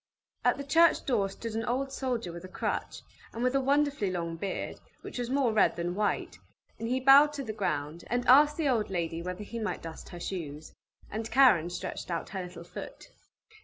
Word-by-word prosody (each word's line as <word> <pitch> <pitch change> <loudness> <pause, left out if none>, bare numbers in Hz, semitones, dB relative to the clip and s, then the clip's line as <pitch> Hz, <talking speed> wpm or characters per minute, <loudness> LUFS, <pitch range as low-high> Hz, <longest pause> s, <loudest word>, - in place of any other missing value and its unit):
At - - +3
the 280 - -5
church 330 +4 +4
door 210 -7 +1
stood 225 +3 -6
an 225 +1 -2
old 265 +3 -1
soldier 250 -9 -2
with 170 +1 -8
a - - -7
crutch, 185 - -3 0.3
and 230 - -3
with 255 +1 +2
a 275 - +2
wonderfully 280 -5 +1
long 170 -2 -3
beard, 190 +3 -4 0.2
which - - -7
was 245 -1 -2
more 265 -4 +2
red 215 - +4
than 175 +1 -2
white, 205 +2 -1 0.4
and 230 - -3
he 255 +2 +1
bowed 275 +3 +7
to 280 -2 -4
the 220 -4 -5
ground, 160 -5 -2
and 245 +1 -1
asked 295 +3 +7
the 320 -3 +1
old 235 -5 +1
lady 170 -3 -2
whether 180 +3 -5
he 230 +3 -6
might 215 - -3
dust 165 -1 -8
her 175 - -9
shoes. 155 -5 -6 0.4
And 220 +2 -4
Karen 230 -11 +5
stretched 175 - -5
out 170 -1 -3
her 190 -1 -4
little 180 -1 -8
foot. 175 - -9
220 Hz, 205 wpm, -29 LUFS, 175-265 Hz, 0.4 s, bowed